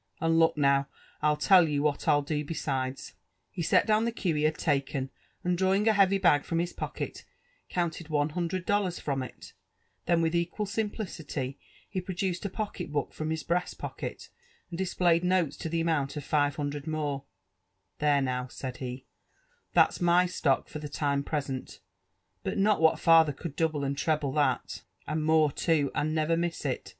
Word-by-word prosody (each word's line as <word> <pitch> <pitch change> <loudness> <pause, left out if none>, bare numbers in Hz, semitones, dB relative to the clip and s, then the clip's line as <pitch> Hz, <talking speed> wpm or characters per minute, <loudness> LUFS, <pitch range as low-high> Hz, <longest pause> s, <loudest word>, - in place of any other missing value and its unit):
And 165 0 +2
look 165 -1 +4
now, 140 -1 +3 0.3
TU 150 0 +3
tell 175 +2 +5
you 145 -1 0
what 150 -2 +1
rii 145 -2 +5
do 150 0 -1
besides.'^ 135 -4 -3 0.4
He - - -5
set 165 - +3
down 215 0 +3
the 235 - 0
cue 190 -7 -1
he 150 0 +1
had 155 0 +1
taken, 140 -3 -1 0.3
and 180 0 +1
drawing 190 +4 +2
a 220 - +6
heavy 195 -1 +4
bag 170 -7 +4
from 165 - -2
his 175 +1 -1
pocket, - - -5 0.5
counted 170 -2 -2
one 150 -1 +1
hundred 175 +2 -3
dollars 200 -4 +1
from 140 -2 -2
it; 130 - -9 0.5
then 170 -1 +3
with 160 0 +1
equal 170 +5 -1
sim 210 +2 -1
plicity 150 - -5 0.3
he 185 - -3
produced 180 0 -3
a - - -1
pocket 200 -4 -5
book 145 -2 -2
from 155 0 -4
his 160 -1 -2
breast 180 +1 -1
pocket, - - -6 0.4
and 170 - -5
dis^ 190 -1 -3
played 170 -1 +4
notes 180 -5 +1
to 165 - -4
the 165 +1 0
amount 155 -4 0
of 145 - -4
five 145 -1 +1
hundred 145 0 -4
more: 145 -3 -2 0.4
*' - - -50
There 145 -2 +3
now 125 -1 -1
I" - - -11
said 130 0 -6
he, 130 0 -6 0.7
'Mhal's - - +4
my 175 +1 +5
stock 150 -6 0
for 155 - -7
the 150 -1 -6
time 140 -1 0
present; 140 -3 -4 0.6
not - - -2
but 205 -2 +3
what 160 -1 +4
father 165 -3 +6
eould 145 +1 -7
double 155 -3 0
and 140 0 -1
treble 150 -1 0
that, 145 +1 0 0.2
and 155 0 -2
more 155 -1 +4
too, 150 -3 +1
and 155 +1 -1
never 155 +1 +1
m 165 - +1
jss 170 -1 -3
it. - - -2
160 Hz, 195 wpm, -29 LUFS, 145-175 Hz, 0.7 s, a